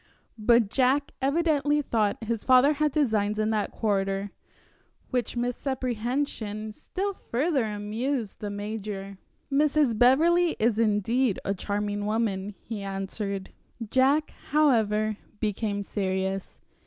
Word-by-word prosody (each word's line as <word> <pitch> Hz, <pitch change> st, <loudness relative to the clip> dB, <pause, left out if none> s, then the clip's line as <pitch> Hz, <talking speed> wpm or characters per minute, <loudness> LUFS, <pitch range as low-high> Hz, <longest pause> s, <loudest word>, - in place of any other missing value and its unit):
But 230 Hz, -1 st, +4 dB
Jack 270 Hz, +2 st, +2 dB
evidently 295 Hz, 0 st, +2 dB
thought 220 Hz, -4 st, 0 dB
his 225 Hz, -1 st, -2 dB
father 260 Hz, +3 st, +6 dB
had 300 Hz, 0 st, +1 dB
designs 215 Hz, -8 st, +1 dB
in 215 Hz, 0 st, +1 dB
that 215 Hz, -2 st, 0 dB
quarter, 195 Hz, -2 st, -1 dB, 0.8 s
which 245 Hz, -2 st, -1 dB
misapprehension 240 Hz, -3 st, -2 dB
still 395 Hz, -, -3 dB
further 275 Hz, -4 st, 0 dB
amused 215 Hz, +3 st, -3 dB
the 205 Hz, -, -4 dB
major. 205 Hz, -1 st, -5 dB, 0.3 s
"Mrs. 290 Hz, -3 st, +3 dB
Beverley 325 Hz, +9 st, +4 dB
is 225 Hz, 0 st, +1 dB
indeed 225 Hz, +2 st, +2 dB
a 195 Hz, -, +1 dB
charming 205 Hz, +1 st, -2 dB
woman," 210 Hz, -3 st, -1 dB
he 215 Hz, -3 st, -5 dB
answered. 195 Hz, 0 st, -4 dB, 0.4 s
Jack, 275 Hz, +4 st, +3 dB, 0.2 s
however, 215 Hz, -8 st, +2 dB, 0.2 s
became 205 Hz, -1 st, -1 dB
serious. 190 Hz, -1 st, -2 dB
220 Hz, 110 wpm, -27 LUFS, 205-265 Hz, 0.8 s, father